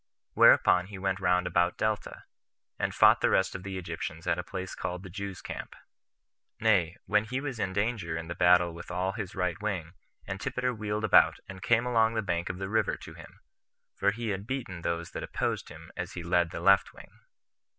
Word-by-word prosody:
Whereupon 90 +1 +6
he 100 -1 -8
went 95 0 -1
round 90 -1 +2
about 85 0 +1
Delta, 110 -2 -2 0.6
and - - 0
fought - - +6
the - - +3
rest 95 0 +2
of 95 - -6
the 95 0 -5
Egyptians 85 -1 -5
at 90 -1 +1
a - - -3
place 95 -1 -6
called 90 +1 -5
the 95 - -10
Jews' 100 -2 -6
Camp; - - -7 0.8
nay, 100 -6 +2
when 105 +1 +2
he 125 +4 -3
was 135 -5 -5
in 95 -3 -1
danger 100 -5 -1
in 80 0 -6
the 85 - -4
battle 90 -1 +4
with 85 - -10
all 90 +1 -1
his 100 -3 -6
right 90 -2 -1
wing, 90 -6 -3 0.3
Antipater 125 +6 -2
wheeled 105 -1 -3
about, 110 - +5
and 95 0 -9
came 115 +3 +2
along 115 -2 +2
the 110 - 0
bank 85 -2 -2
of 90 - -4
the 95 0 -4
river 110 +3 +1
to - - -11
him; - - -14 0.5
for 100 - +2
he 115 +2 -3
had 100 +1 -3
beaten 115 -10 -4
those 85 0 -3
that - - -5
opposed - - -2
him - - -12
as - - -5
he 90 - -6
led 85 0 +2
the - - -6
left 95 +2 +4
wing. - - -15
95 Hz, 205 wpm, -29 LUFS, 90-110 Hz, 0.8 s, Whereupon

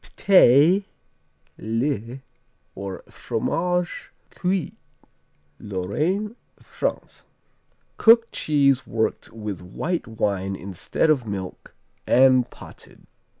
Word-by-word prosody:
P'teux, 180 0 +5 0.8
le, 115 +2 -2 0.5
or 100 -1 -7
Fromage 180 +1 -2 0.2
Cuit 185 -3 -2 0.9
Lorraine, 150 - -2 0.2
France - - -5 0.7
Cooked 230 0 +5
cheese 140 -3 +1
worked 110 -1 -2
with 105 -5 -6
white 160 - -4
wine 100 -3 -2
instead 95 - -1
of 130 -7 0
milk, 95 -3 -7 0.3
and 130 -1 +5
potted. - - -14
130 Hz, 80 wpm, -23 LUFS, -, 0.9 s, P'teux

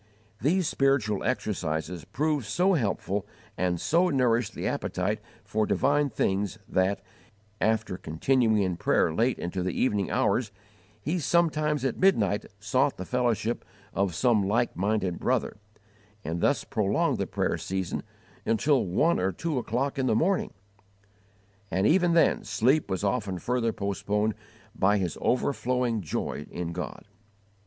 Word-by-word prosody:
These 170 - +2
spiritual 130 -7 +1
exercises 90 - -2
proved 150 -5 -1
so 180 - +2
helpful 105 - -1 0.3
and 90 -1 0
so 175 - +2
nourished 120 -5 +1
the - - -4
appetite 100 +4 -1 0.2
for 105 +2 0
divine 145 +2 +2
things 100 -2 -1
that, 95 +1 +1 0.6
after 110 -3 +1
continuing 110 +7 +2
in 90 -2 -1
prayer 80 - +2
late 120 +8 +1
into 90 +2 -3
the 90 0 -2
evening 105 -7 +1
hours, 120 -5 +1 0.5
he 155 - -1
sometimes 155 -3 +1
at 135 - -1
midnight 110 - +2
sought 130 +8 +1
the 95 - -5
fellowship 120 -1 0 0.3
of 95 -3 0
some 115 +1 +3
like 115 +4 +1
minded 95 -2 0
brother, - - 0 0.7
and 85 +2 -3
thus - - +2
prolonged - - 0
the - - -1
prayer - - 0
season 95 -2 -3 0.4
until 135 +4 +2
one 125 - +2
or 95 +1 +1
two 150 - -2
o'clock 135 +5 -2
in 130 - +1
the 110 - +3
morning; 185 - +1 1.2
and 95 +2 +1
even 175 - +4
then 165 - +4
sleep 130 +6 +2
was 95 +1 -2
often 100 -3 -1
further 115 +4 0
postponed 105 +1 -1 0.4
by 100 +2 +3
his 90 -5 -1
overflowing 125 -3 0
joy 75 -3 -4
in 85 -1 -4
God. 90 +1 -6
110 Hz, 140 wpm, -27 LUFS, 95-135 Hz, 1.2 s, even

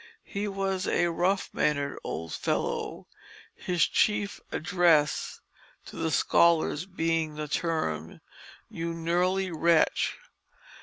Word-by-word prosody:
He 200 +1 -3
was 195 -1 -2
a 175 -1 +2
rough 185 +4 0
mannered 145 -2 0
old 80 0 -5
fellow; - - -2 0.5
his 175 -3 +1
chief 205 -1 0
address 170 -4 +2 0.4
to - - -11
the 160 - -1
scholars 165 +2 +3
being 165 -4 -1
the 150 0 -4
term, 140 - -2 0.5
"You 165 0 -4
gnurly 180 +3 0
wretch." 165 +1 +2
170 Hz, 105 wpm, -28 LUFS, 155-185 Hz, 0.5 s, scholars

